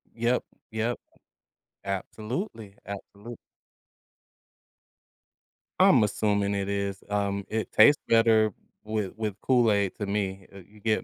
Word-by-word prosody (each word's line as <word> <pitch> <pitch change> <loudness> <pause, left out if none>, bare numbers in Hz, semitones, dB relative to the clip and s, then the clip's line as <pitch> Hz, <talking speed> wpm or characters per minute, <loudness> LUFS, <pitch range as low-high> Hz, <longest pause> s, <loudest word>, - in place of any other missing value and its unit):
Yep, 120 +2 +1 0.3
yep. 110 +2 -1 0.9
Absolutely, 110 - -5
absolute 100 +3 -9 2.4
I'm - - +6
assuming 100 -1 +1
it 100 0 -2
is. 100 -1 -2
Um, 100 -1 -1
it 110 0 -2
tastes 145 +7 +6
better 115 -2 +4 0.3
with 105 -3 -2
with 110 -3 -3
Kool-Aid 110 -7 +2
to 100 - -2
me, 100 -2 -3
uh, 100 - -10
you 105 +3 -17
get 110 +1 0
105 Hz, 110 wpm, -27 LUFS, 100-110 Hz, 2.4 s, I'm